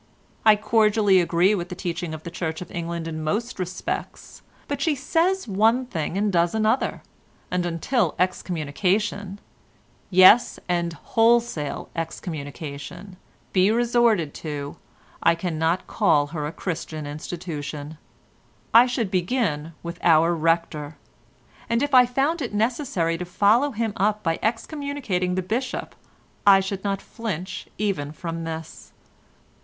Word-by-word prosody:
I 215 - +9
cordially 210 -2 +3
agree 175 +3 +3
with 180 -3 -3
the 180 - -5
teaching 175 -2 -4
of 155 - -11
the 170 - -7
Church 160 -2 -3
of 180 - -9
England 170 -2 -4
in 155 -1 -4
most 210 +9 -2
respects, 185 0 -5 0.3
but - - -3
she 315 -4 +2
says 335 +7 0
one 225 +5 +3
thing 170 -5 -3
and 205 0 +1
does 170 +2 +2
another, 220 +4 +1 0.5
and 180 -1 0
until 175 - 0
excommunication—yes, 185 +4 +1
and 170 -1 0
wholesale 225 -8 +1
excommunication—be 165 +4 -4
resorted 235 -8 +2
to, 145 -2 -6 0.4
I - - +4
cannot 165 0 -1
call 145 -3 +2
her 150 -3 -2
a - - -5
Christian 165 -3 -5
institution. 150 -1 -6 0.7
I 235 +2 +8
should 235 -6 -2
begin 175 - -1
with 170 +1 -6
our 165 +1 +5
Rector, 165 -2 -1 0.7
and 230 +3 +2
if 285 -1 -2
I 250 -1 +7
found 280 +7 0
it 235 -5 -4
necessary 210 - 0
to 180 - -3
follow 210 +10 +3
him 225 -4 -2
up 210 +1 +1
by 165 -1 0
excommunicating 225 - -2
the 185 - -1
Bishop, 240 +7 -3 0.5
I 195 -1 +9
should 195 0 -4
not 195 -1 -2
flinch 195 -6 -5
even 190 -9 -1
from 165 +1 -5
this. 160 -1 -7
185 Hz, 130 wpm, -24 LUFS, 165-220 Hz, 0.7 s, I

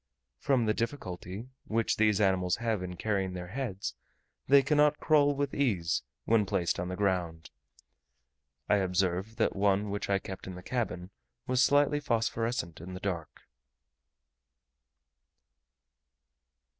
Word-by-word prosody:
From 130 -4 +2
the 110 - +2
difficulty 105 -4 -4 0.2
which 115 0 0
these 105 -1 +3
animals 95 -3 +2
have 115 -4 -1
in 90 -1 -5
carrying 95 -2 -1
their 90 -1 -6
heads, 110 -5 -4 0.5
they 140 +1 +6
cannot 150 +1 +3
crawl 145 -2 +4
with 140 -1 -2
ease 95 -12 +1 0.2
when 110 -3 +3
placed 90 -4 0
on 90 - -2
the 90 - -3
ground. 90 -5 -1 1.2
I 105 - +4
observed 95 +3 0
that 115 - +1
one 100 +1 +2
which 100 0 -3
I 100 - +3
kept 95 -1 -8
in 95 - -6
the 90 - -10
cabin 95 -7 -3 0.3
was 130 0 +2
slightly 145 +1 +4
phosphorescent 115 - -1
in 90 +2 -7
the - - -6
dark. 90 -5 -4
100 Hz, 130 wpm, -30 LUFS, 90-120 Hz, 1.2 s, they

